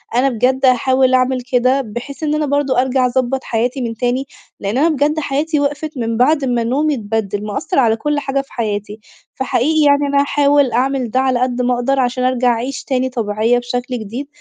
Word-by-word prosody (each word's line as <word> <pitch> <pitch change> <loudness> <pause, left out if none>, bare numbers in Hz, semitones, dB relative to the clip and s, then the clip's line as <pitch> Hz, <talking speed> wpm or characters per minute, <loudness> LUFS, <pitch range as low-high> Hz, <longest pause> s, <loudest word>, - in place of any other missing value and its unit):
أنا 260 +3 +3
بجد 255 +2 +1
هاحاول 260 +1 +3
أعمل 255 0 +2
كده، 255 +2 +3
بحيث 245 +6 -7
إنّ 300 0 0
أنا 305 0 0
برضه 280 -3 +1
أرجع 260 0 +1
أضبط 260 +1 -1
حياتي 245 +4 -1
من 230 -2 -3
تاني، 245 +4 -1 0.3
لإنّ 200 +4 -2
أنا 310 +5 +3
بجد 300 +1 +1
حياتي 300 +2 -1
وقفت 290 +1 -3
من 230 -2 -2
بعد 280 +3 +3
ما 245 -2 0
نومي 290 +6 +1
اتبَدِّل، 210 -3 -3
مأثر 275 - -2
على 225 -4 +3
كل 295 +5 -1
حاجة 275 -1 -1
في 275 - -19
حياتي، 210 -2 -3 0.4
فحقيقي 275 +4 +1
يعني 285 0 +3
أنا 280 - +4
هاحاول 285 -2 +2
أعمل 255 -1 0
ده 255 - +1
على 260 -2 +1
قَدّ 250 0 0
ما 250 0 +1
أقدر، 245 +3 0
عشان 250 0 0
أرجع 255 -1 +2
أعيش 245 +3 -2
تاني 260 -1 -1
طبيعية 225 -1 0
بشكل 245 0 -4
جديد، 230 +7 -6
255 Hz, 195 wpm, -17 LUFS, 240-275 Hz, 0.4 s, أنا